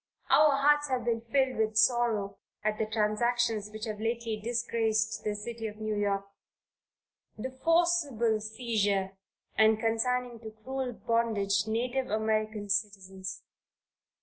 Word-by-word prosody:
Our 300 -1 +6
hearts 295 +1 +3
have 255 -3 -1
been 230 -1 0
filled 260 +3 0
with 215 -1 0
sorrow 220 -3 +2 0.2
at 215 0 -1
the 220 - 0
transactions 220 0 0
which 215 +1 -6
have 215 -2 -5
lately 230 0 -1
disgraced 225 -2 0
the 210 -1 -1
city 225 +2 -5
of 210 - -8
New 215 0 -3
York; 200 -1 0 1.1
the 255 +4 -4
forcible 325 -10 +2
seizure 210 -4 0 0.4
and 220 0 +4
consigning 240 +1 0
to 220 -1 -8
cruel 265 0 -3
bondage 220 -3 0
native 250 +4 -1
American 215 0 -1
citizens. 195 -1 -3
220 Hz, 125 wpm, -29 LUFS, 210-240 Hz, 1.1 s, Our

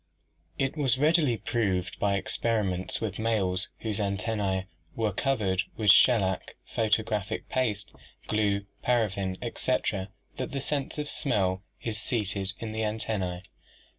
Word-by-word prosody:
It 135 +1 0
was 135 -5 +2
readily 150 -4 +3
proved 95 -7 -1
by 100 -1 +2
experiments 95 -2 0
with 105 -3 -3
males 95 -5 +1
whose 110 -2 -1
antennae 100 -1 0 0.3
were 110 -3 0
covered 105 -7 +1 0.2
with 105 -4 +6
shellac, 100 -7 +4
photographic 105 -3 0
paste, 105 -5 0 0.4
glue, 100 -2 +1 0.2
paraffin, 100 -6 +1
etc., 110 -5 -1 0.3
that - - -4
the 140 - -1
sense 140 +1 -2
of 150 -1 -2
smell 95 -11 +1 0.2
is 110 -2 -2
seated 100 -4 +1
in 115 -2 -5
the 110 0 -2
antennae. 105 -5 -2
105 Hz, 125 wpm, -28 LUFS, 95-115 Hz, 0.4 s, with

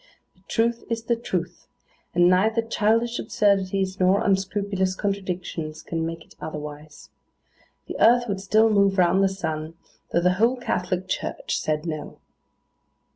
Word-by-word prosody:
The 185 - -29
truth 235 +1 0
is 230 -1 -2
the 235 +1 +1
truth; 180 -6 -4 0.5
and 175 0 +5
neither 220 +6 +3
childish 230 +2 +1
absurdities, 195 -4 +1
nor 185 +2 +3
unscrupulous 195 -1 0
contradictions, 180 -6 -4
can 165 -1 -2
make 165 0 -7
it - - -21
otherwise. 150 -1 -8 0.7
The - - -7
earth 245 +1 +6
would 195 -2 -3
still 215 +3 +3
move 200 -1 +3
round 185 +2 +4
the 195 - +4
sun, 160 -4 -4 0.4
though 170 - +2
the 180 +1 +3
whole 240 +3 +4
Catholic 185 -6 -2
Church - - -3
said 155 +1 -2
No. 155 -3 -5
190 Hz, 140 wpm, -24 LUFS, 170-215 Hz, 0.7 s, earth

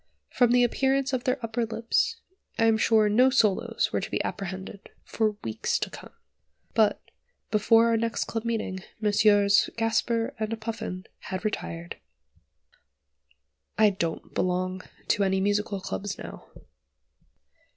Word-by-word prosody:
From 245 -2 +3
the 245 0 +5
appearance 270 +2 +1
of 250 -1 -1
their 255 +1 +1
upper 230 +1 -2
lips, 230 - 0 0.4
I 225 - +3
am 225 -1 +3
sure 220 -1 +4
no 245 +5 +5
solos 220 -7 +1
were - - 0
to - - -5
be - - -1
apprehended 190 +1 -6
for 215 -1 -1
weeks 110 -1 -1
to - - -3
come. - - -11 0.6
But, 220 -2 +3 0.5
before 225 +2 +5
our 230 - +3
next 230 +1 -1
club 225 -1 -4
meeting, 225 -5 -2 0.2
Messrs. 205 -1 +4
Gasper 225 0 0
and 220 +1 -2
Puffin 215 -4 -5
had 190 +2 -6
retired. 170 -5 -4 1.8
I 215 -1 +5
don't 170 -4 -4
belong 185 +1 -1 0.3
to 205 - +3
any 190 0 +1
musical 205 +1 0
clubs 195 +1 -4
now. - - -10
215 Hz, 135 wpm, -27 LUFS, 195-230 Hz, 1.8 s, the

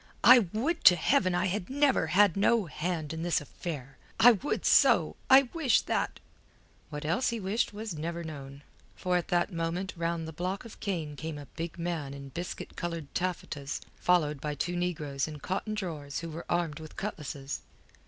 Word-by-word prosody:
"I 250 0 +10
would 310 +10 -1
to 180 - +10
Heaven 185 - +2
I 175 +1 +1
had 185 0 -2
never 275 - +2
had 190 +3 +4
no 210 +2 +3
hand 160 -1 -3
in 160 - -4
this 170 0 +1
affair. 145 -3 -7 0.2
I 245 - +9
would 245 +6 -2
so! - - +5
I 265 +1 +9
wish 295 -8 +3
that...." - - -1 0.7
What 150 -1 -6
else 175 +12 +1
he 235 -1 -2
wished 205 +4 0
was 210 -1 -5
never 170 +2 -4
known, 140 -3 -8 0.3
for 180 -1 -1
at 175 - 0
that 175 +2 +1
moment 170 +3 -2
round 170 -1 -2
the 160 - -7
block 185 +7 -3
of 230 - -11
cane 165 -7 -3
came 160 +1 -5
a 145 - -8
big 165 +1 -5
man 165 -5 -3
in 140 0 -9
biscuit 175 +7 -6
coloured 170 -4 -5
taffetas 160 -5 -3 0.2
followed 150 -6 +2
by 150 -1 -3
two 175 +5 -2
negroes 155 -6 -2
in 155 -1 -7
cotton 195 +7 -3
drawers 155 -9 -4
who 165 -1 -6
were 165 +2 -7
armed 170 -3 0
with 155 -1 -10
cutlasses. 145 -8 -5
170 Hz, 185 wpm, -30 LUFS, 150-195 Hz, 0.7 s, I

